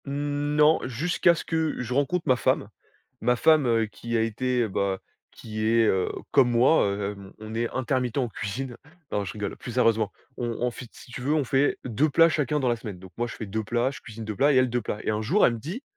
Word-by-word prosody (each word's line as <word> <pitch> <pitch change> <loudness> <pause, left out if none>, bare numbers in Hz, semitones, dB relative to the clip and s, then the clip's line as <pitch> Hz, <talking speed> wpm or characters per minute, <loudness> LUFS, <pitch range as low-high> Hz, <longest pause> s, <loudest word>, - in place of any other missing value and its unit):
Mmh, 145 +1 -2
non, 150 +1 +5
jusqu'à 165 +7 +2
ce - - -5
que 160 -2 0
je 125 0 -4
rencontre 145 +6 0
ma 130 - +5
femme. - - 0 0.5
Ma 125 +1 +3
femme, 150 +2 +4
heu, 115 -1 +2
qui 115 +2 -4
a - - +2
été, 120 +2 0
bah, 95 -1 -1 0.3
qui 110 -1 -6
est, 115 +1 +4
heu, 95 -3 +1 0.2
comme 125 - +5
moi 120 +3 +4
hem, 100 -1 -5
on 110 0 -8
est 115 +1 -1
intermittent 130 -1 -1
en 130 -3 +1
cuisine. 120 +4 -5 0.3
Non, 105 - 0
je 95 - -6
rigole. 105 -2 -4
Plus 125 - -8
sérieusement, 115 -3 +2 0.3
on 120 - -2
on 125 0 +1
fait, 120 - -9
si - - -15
tu 125 - -7
veux, 140 +4 0
on 150 - +2
fait 135 +3 +1
2 130 +6 +1
plats 165 +4 +5
chacun 150 -2 0
dans 130 - 0
la 120 - +2
semaine. 110 -5 -8
Donc 95 0 -13
moi, 120 +1 -1
je - - -8
fais 110 - -6
2 110 +2 -3
plats, 120 +4 0
je 140 - -10
cuisine 110 0 -9
2 110 -1 -4
plats, 140 +7 +4
et - - +2
elle 130 -1 +4
2 120 0 0
plats. 105 -1 -4
Et - - 0
un 105 0 -1
jour, 170 - +3
elle 120 - +3
me 115 - -5
dit: 180 - -6
120 Hz, 250 wpm, -26 LUFS, 110-140 Hz, 0.5 s, non